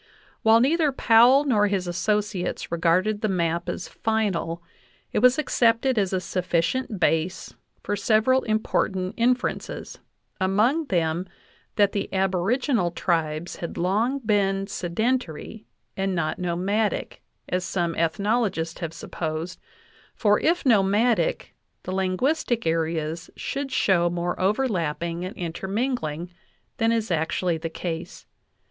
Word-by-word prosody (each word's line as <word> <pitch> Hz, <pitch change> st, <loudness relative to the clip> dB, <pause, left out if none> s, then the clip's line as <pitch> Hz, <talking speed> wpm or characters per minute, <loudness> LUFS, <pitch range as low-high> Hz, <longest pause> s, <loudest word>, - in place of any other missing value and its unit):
While 225 Hz, 0 st, +5 dB
neither 305 Hz, +3 st, +3 dB
Powell 250 Hz, +2 st, +5 dB
nor 215 Hz, -7 st, +3 dB
his 195 Hz, -2 st, -1 dB
associates 205 Hz, +2 st, -1 dB
regarded 180 Hz, +5 st, +1 dB
the 215 Hz, -, +1 dB
map 170 Hz, -1 st, -1 dB
as 175 Hz, -, -4 dB
final, 195 Hz, -7 st, -1 dB, 0.5 s
it -, -, +2 dB
was 250 Hz, +3 st, +5 dB
accepted 240 Hz, -4 st, +2 dB
as 195 Hz, -2 st, 0 dB
a 190 Hz, -, +1 dB
sufficient 180 Hz, +6 st, -1 dB
base 165 Hz, +2 st, 0 dB, 0.3 s
for 205 Hz, -, -1 dB
several 220 Hz, +5 st, +3 dB
important 195 Hz, -3 st, 0 dB
inferences, 250 Hz, +1 st, -1 dB, 0.4 s
among 215 Hz, +12 st, +2 dB
them 170 Hz, -, 0 dB, 0.5 s
that 205 Hz, -2 st, +4 dB
the 200 Hz, -, -3 dB
aboriginal 195 Hz, +4 st, +1 dB
tribes 165 Hz, -2 st, -1 dB
had 170 Hz, -, -6 dB
long 215 Hz, +10 st, +1 dB
been 200 Hz, -5 st, +1 dB
sedentary 210 Hz, +1 st, -3 dB, 0.3 s
and 195 Hz, -1 st, -1 dB
not 155 Hz, -2 st, -1 dB
no 175 Hz, -1 st, -1 dB
madic, 205 Hz, +4 st, -1 dB, 0.3 s
as 180 Hz, 0 st, -1 dB
some 175 Hz, -2 st, -1 dB
ethnologists 170 Hz, 0 st, 0 dB
have 165 Hz, -2 st, -4 dB
supposed, 165 Hz, 0 st, -5 dB, 0.6 s
for 210 Hz, -2 st, +3 dB
if 335 Hz, +1 st, +1 dB
nomadic 225 Hz, -, +2 dB, 0.3 s
the -, -, -5 dB
linguistic 230 Hz, +7 st, 0 dB
areas 160 Hz, 0 st, -1 dB
should 275 Hz, -1 st, -4 dB
show 180 Hz, -8 st, +3 dB
more 175 Hz, +1 st, -2 dB
overlapping 175 Hz, -, 0 dB
and 185 Hz, -, -6 dB
interming 195 Hz, +9 st, -2 dB
ling 155 Hz, +3 st, -5 dB, 0.5 s
than 225 Hz, -2 st, +2 dB
is 225 Hz, -4 st, -1 dB
actually 165 Hz, +1 st, 0 dB
the 165 Hz, +1 st, -4 dB
case. 165 Hz, 0 st, -6 dB
190 Hz, 125 wpm, -25 LUFS, 170-225 Hz, 0.6 s, While